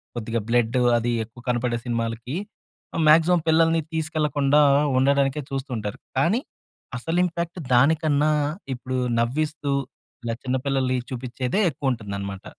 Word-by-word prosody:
కొద్దిగా 115 0 -2
బ్లడ్డ్ 120 +1 +2 0.2
అదీ, 120 +1 0
ఎక్కువ 120 +2 -16
కనపడే 120 -1 0
సినిమాలకి 115 +3 -3 0.6
ఆహ్, 165 - +1
మాగ్జిమం 165 +2 +5
పిల్లలని 165 0 +4
తీసుకెళ్లకుండా 150 -2 +2 0.4
ఉండడానికే 140 +1 +2
చూస్తూంటారు, 125 -7 -4 0.2
కానీ 175 - +3 0.6
అసలింపాక్ట్ 170 +4 -1
దాని 140 +7 +5
కన్నా, 150 0 +2 0.4
ఇప్పుడూ 130 +1 -4 0.2
నవ్విస్తూ 145 +4 -1 0.5
ఇలా 115 - -2
చిన్న 130 0 0
పిల్లలని 130 -2 +1
చూపించ్చేదే 125 - -2
ఎక్కువుంటందనమాట. 100 -8 -4
135 Hz, 110 wpm, -24 LUFS, 120-155 Hz, 0.6 s, మాగ్జిమం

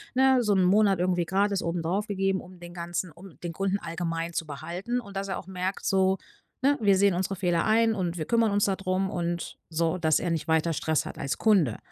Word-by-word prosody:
ne, 265 -1 +5
so 210 -2 +2
‘n 185 - +3
Monat 195 0 +4
irgendwie 180 -1 +1
gratis 195 +2 +1
obendrauf 170 +5 -1
gegeben, 195 -1 0
um 180 0 -14
den 175 0 -9
Ganzen 175 0 -4
um 175 +2 -14
den 175 - -4
Kunden 195 +3 -1
allgemein 165 0 -3
zu 165 - -2
behalten 175 - -4
und 200 -4 -9
dass 195 - -3
er 190 - -3
auch 185 - -12
merkt 190 +1 -3
so, 190 0 +3 0.4
ne, 285 +2 +3
wir 200 -2 +5
sehen 200 -2 +3
unsere 190 +2 -1
Fehler 175 -2 +1
ein 225 +1 +3
und 175 -3 -2
wir 155 - -2
kümmern 230 +1 +2
uns 205 0 +2
da 195 - +1
drum 190 0 -1
und 175 0 -3
so, 165 +2 0
dass 160 -3 +2
er 175 - -2
nicht 165 -1 -2
weiter 160 +1 +2
Stress 155 0 0
hat - - -8
als 140 +1 -3
Kunde. 185 - +3
185 Hz, 225 wpm, -27 LUFS, 170-200 Hz, 0.4 s, ne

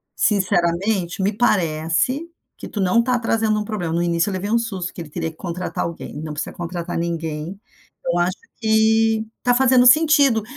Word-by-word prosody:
Sinceramente, 185 -1 +1
me 200 +3 +1
parece 195 - 0 0.3
que - - -8
tu 210 - -6
não 195 +5 +3
tá 250 0 +1
trazendo 225 -2 +1
um - - -2
problema. 190 -7 -3
No 170 - +1
início 170 +2 +1
eu - - -3
levei 190 +2 -3
um 235 - +3
susto 195 -6 -4
que - - -7
ele 160 - -9
teria 165 +1 -4
que - - -22
contratar 180 0 -4
alguém, 165 -3 -6
não 155 -1 -5
precisa 150 - -5
contratar 175 0 -4
ninguém. 165 +1 -4 0.5
Eu 175 0 +1
acho 180 +3 0 0.2
que 220 0 +3 0.2
tá 245 - +3
fazendo 255 -1 +4
sentido. 285 -4 +5
190 Hz, 180 wpm, -21 LUFS, 170-225 Hz, 0.5 s, sentido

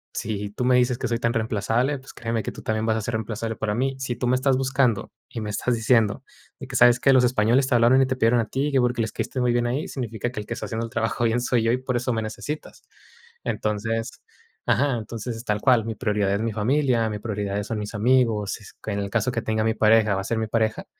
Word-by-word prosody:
si 105 -1 -3
tú 115 - -4
me 125 0 +4
dices 125 -1 +2
que 130 - -1
soy 115 - +1
tan 115 0 0
reemplazable, 115 +5 0
pues 135 - -14
créeme 115 -1 -3
que - - -4
tú - - -11
también 110 0 -1
vas 110 - +2
a - - -2
ser 115 +3 -4
reemplazable 110 +1 -3
para 105 -1 -2
mí. 135 +3 0
Si 130 -2 -3
tú 125 - -2
me 125 - +3
estás 130 0 +2
buscando, 130 -4 +1 0.2
y 115 - -6
me 105 - -4
estás 120 +4 0
diciendo 115 +1 +2 0.4
de 135 - -8
que, 130 - -8
'¿Sabes 120 0 +6
qué? 135 - +4
Los 130 -1 +5
españoles 120 +2 +3
te 130 - 0
hablaron 120 +3 +5
y - - +4
te 130 - -1
pidieron 120 -1 +3
a - - -2
ti, 140 +2 -1
que 135 - +3
porque 125 -1 +1
les 110 -2 -2
caíste 130 - -3
muy 125 -1 +2
bien 120 0 +1
a 120 - -1
ellos', 150 - -4
significa 120 -3 -3
que 125 - -5
el - - -10
que - - -3
está - - -5
haciendo 115 0 -3
el 115 - -9
trabajo 120 +1 -1
bien 115 +1 +1
soy 120 -1 +1
yo, 115 - +2
y 125 - +2
por 130 0 -3
eso 125 +1 -1
me 110 - -1
necesitas". 145 +8 -6 0.6
Entonces, 115 +2 -2 0.5
ajá, 135 -2 +2
entonces, 115 +1 -6
tal 105 -2 -1
cual, 125 -4 +4
mi 115 - -4
prioridad 105 -3 0
es 100 - 0
mi 115 -1 -1
familia, 120 0 +1
mi 105 - -3
prioridad 105 -2 -3
son 110 +1 -4
mis 105 +1 -6
amigos, 110 -2 +2
s 105 - -14
en 100 -1 -1
el 100 -1 -3
caso 115 +1 +1
que 115 - -2
tenga 110 0 0
mi 110 - +2
pareja, 110 -1 +4
va 95 - -1
a - - -7
ser 115 - -1
mi 110 - 0
pareja, 110 0 0
115 Hz, 265 wpm, -24 LUFS, 110-125 Hz, 0.6 s, Sabes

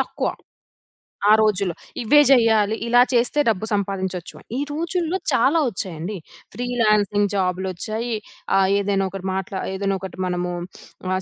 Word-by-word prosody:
తక్కువ. - - -2 1.0
ఆ - - +7
రోజుల్లో 200 -5 +1 0.3
ఇవే 270 +6 +5
చేయాలి. 220 -4 +4
ఇలా 245 +1 +5
చేస్తే 245 +5 +2
డబ్బు 215 0 0
సంపాదించొచ్చు 190 -3 -2
అని. - - -19
ఈ - - 0
రోజుల్లో 335 +3 -1
చాలా 280 +8 +3
వచ్చాయండి. 185 -1 -5 0.4
ఫ్రీలాన్సింగు 215 -4 +1
జాబులొచ్చాయి. 190 +5 -2 0.4
ఆహ్, 190 -1 +4
ఏదైనా 195 -1 0
ఒకరు 190 0 -8
మా 190 - -1 0.6
ఒకటి, 190 -1 -8
మనము 180 0 -2 0.6
ఆహ్, 185 - 0
205 Hz, 125 wpm, -22 LUFS, 190-235 Hz, 1.0 s, ఆ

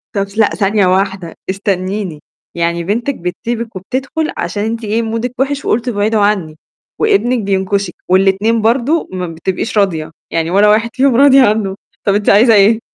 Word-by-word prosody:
طب 200 - +1
ث 200 +2 -11
لأ، 215 - +4
ثانية 205 -1 +1
واحدة 190 -2 -1 0.2
استنيني، 190 -3 -2 0.4
يعني 170 0 -1
بنتِك 235 +9 -2
بتسيبِك 230 +5 -5
وبتدخل 265 - -3
عشان 205 - -3
أنتِ 225 +1 -3
إيه 220 +2 0
مودِك 230 +2 -3
وحِش، 280 +1 -1
وقُلتِ: 235 +3 0
"ابعدوا 215 -1 0
عني." 190 -7 0 0.4
وابنِك 395 - +2
بينكشِك، 195 -1 -1 0.2
والاتنين 195 +4 +2
برضه 250 +8 +1
ما 180 -1 -4
بتبقيش 180 +6 -3
راضية، 165 -6 0 0.2
يعني 165 0 -1
ولا 205 +3 +4
واحد 220 +2 +2
فيهم 265 -1 +2
راضية 275 +1 +6
عنه، 210 -5 +1 0.3
طب 200 - +3
أنتِ 205 0 +1
عايزة 225 +3 +6
إيه؟ 210 +2 +5
205 Hz, 160 wpm, -15 LUFS, 190-230 Hz, 0.4 s, راضية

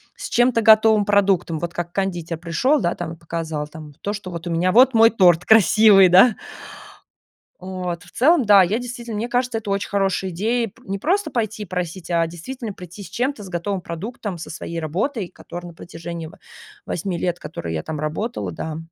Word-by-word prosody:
с - - -7
чем-то 240 -1 +3
готовым 220 -1 +5
продуктом, 195 -5 +2
вот 170 0 -4
как 175 0 -5
кондитер 175 -4 -2
пришел, 180 - +1
да, 175 - 0
там 170 -2 -5
и - - -10
показал 160 -2 -4
там 150 -1 -11
то, 205 - -2
что: 205 -3 -6
"Bот 170 -1 -7
у - - -3
меня 175 +2 +1
вот 260 +3 +6
мой 225 0 +7
торт 180 -6 +4
красивый". 215 -2 +6
Да? 195 +6 +6 1.2
Вот 180 -2 -5
в - - -17
целом, 290 +1 +3
да, 200 -2 +7
я, 205 +6 0
действительно, 240 -2 -6
мне 230 +3 -3
кажется, 245 -1 0
это 215 -2 -8
очень 200 0 -1
хорошая 195 -1 0
идея 225 +7 0
пр 195 - -24
не 195 - -2
просто 390 - 0
пойти 220 -2 -2
и - - -8
просить, 180 -1 -5
а 170 -1 +2
действительно 210 +7 -7
прийти 180 +2 -11
с 185 - -11
чем-то, 255 -1 -2
с 190 - -10
готовым 185 +2 -3
продуктом, 185 +3 -6
со 165 - -8
своей 170 0 -6
работой, 185 - -2
которая 175 0 -10
на 170 - -14
протяжении 170 -1 -8 0.6
8 180 +1 -3
лет, 175 0 -1
которой 85 - -6
я 80 - -3
там 155 -2 -5
работала, 155 - -3
да. 155 - -5
190 Hz, 195 wpm, -21 LUFS, 170-220 Hz, 1.2 s, мой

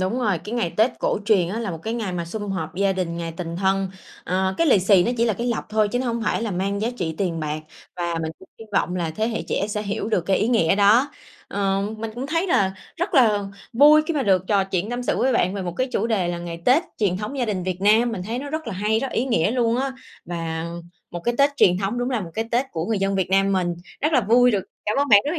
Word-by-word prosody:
đúng 190 +7 -1
rồi. 210 -8 +1
Cái 215 - -5
ngày 230 -8 0
Tết 220 +4 +4
cổ - - 0
truyền 200 -5 +3
á 205 +5 -3
là 225 -4 -3
một 165 - -5
cái 225 +1 -3
ngày 185 -7 -3
sum 205 +3 -5
họp 175 -5 -4
gia 195 +1 +2
đình, 180 -3 -3
ngày 165 -1 -4
tình 170 -1 -5
thân, 195 +1 +1 0.4
à, 190 +1 0
cái 335 - +3
lì 260 - +5
xì 190 0 +5
nó 240 - 0
chỉ 230 - +2
là 230 - +2
cái 235 +4 -3
lộc 240 -2 -1
thôi 215 -1 +2
chứ 245 - -1
nó 255 - -2
hông 235 -1 -1
phải 225 - 0
là 225 - -2
mang 195 +2 -1
giá 220 - 0
trị 165 -6 -3
tiền 175 -4 -1
bạc. 155 0 -3 0.4
Và 170 -1 -2
mình 160 - -2
cũng 190 - -16
hi - - -8
vọng 185 -2 +1
là 170 -3 -1
thế 215 +8 -1
hệ 225 - -3
trẻ 200 - 0
sẽ 210 0 -2
hiểu 205 +1 -3
được 215 -5 +2
cái 195 - +3
ý 220 - +1
nghĩa 205 -10 +3
đó. 220 +8 +5 0.4
Ờ, 195 -1 0 0.2
mình 225 0 -4
cũng 250 +3 -4
thấy 330 +5 0
là 195 - +2 0.2
rất 350 +2 -2
là 215 -7 +4 0.3
vui 295 +5 +7
khi 335 - -1
mà 285 - +1
được 190 -5 +3
trò 200 -2 +3
chuyện 195 +2 -2
tâm 245 +1 -3
sự - - 0
với 260 - +2
bạn 185 -5 +1
về 195 - -3
một 175 - -4
cái 255 - +1
chủ 220 - 0
đề 205 -6 0
là 175 0 -2
ngày 170 -1 -7
Tết 270 +7 +5 0.2
truyền 195 -4 +1
thống 215 +8 -5
gia 250 - +1
đình 200 -5 -2
Việt 185 0 -3
Nam. 220 +4 +4
Mình 185 - -4
thấy 225 +6 -4
nó 285 +2 -6
rất 315 +1 -4
là 230 - -3
hay, 210 +3 +1
rất 270 - -3
ý 240 - 0
nghĩa 220 -8 +1
luôn 235 -1 +1
á. 270 +1 -1 0.3
Và 165 -1 -4 0.5
một 175 - -5
cái 240 - +1
Tết 280 +1 +5
truyền 180 -8 +4
thống 200 +5 -2
đúng 245 +1 -1
là 245 -4 0
một 175 -4 -7
cái 225 - -1
Tết 245 +3 +1
của 165 0 -3
người 220 -1 0
dân 195 0 0
Việt 190 -2 -1
Nam 195 +1 +3
mình. 180 -2 0 0.3
Rất 305 +3 +1
là 255 - +5
vui 245 +3 +4
được 200 -5 0 0.2
cảm 210 - 0
ơn 285 0 +1
bạn 205 -3 +8
rất 295 - -1
là 340 - -2
205 Hz, 290 wpm, -23 LUFS, 185-240 Hz, 0.5 s, bạn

